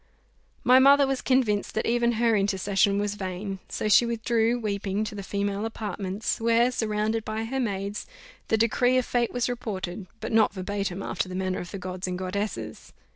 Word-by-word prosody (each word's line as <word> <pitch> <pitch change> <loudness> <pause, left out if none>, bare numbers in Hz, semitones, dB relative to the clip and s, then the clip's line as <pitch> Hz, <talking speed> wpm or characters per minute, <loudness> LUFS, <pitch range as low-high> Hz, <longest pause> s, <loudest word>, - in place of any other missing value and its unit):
My 255 +1 +7
mother 280 +1 +7
was 270 -1 -1
convinced 240 -6 +1
that 220 - 0
even 240 0 +2
her 230 0 +2
intercession 200 0 +2
was 205 0 0
vain; 195 0 -5
so - - -2
she 215 - +6
withdrew, 235 0 +1
weeping, 205 -1 -2
to 215 0 -5
the 205 - -5
female 200 +1 -2
apartments, 210 -2 -3
where, 230 +2 +3
surrounded 220 -1 -1
by 220 +1 -3
her 265 +4 -3
maids, 200 -3 -3 0.4
the 220 - +2
decree 245 +3 +3
of 255 - +1
fate 240 -1 0
was 245 -1 0
reported, 195 -6 -4
but - - -5
not 220 -2 +4
verbatim, 195 0 -3
after 185 - -2
the 185 - -6
manner 185 0 -1
of 175 - -7
the - - -6
gods 185 0 -5
and 180 0 -3
goddesses. 200 +3 -4
210 Hz, 180 wpm, -26 LUFS, 195-235 Hz, 0.4 s, My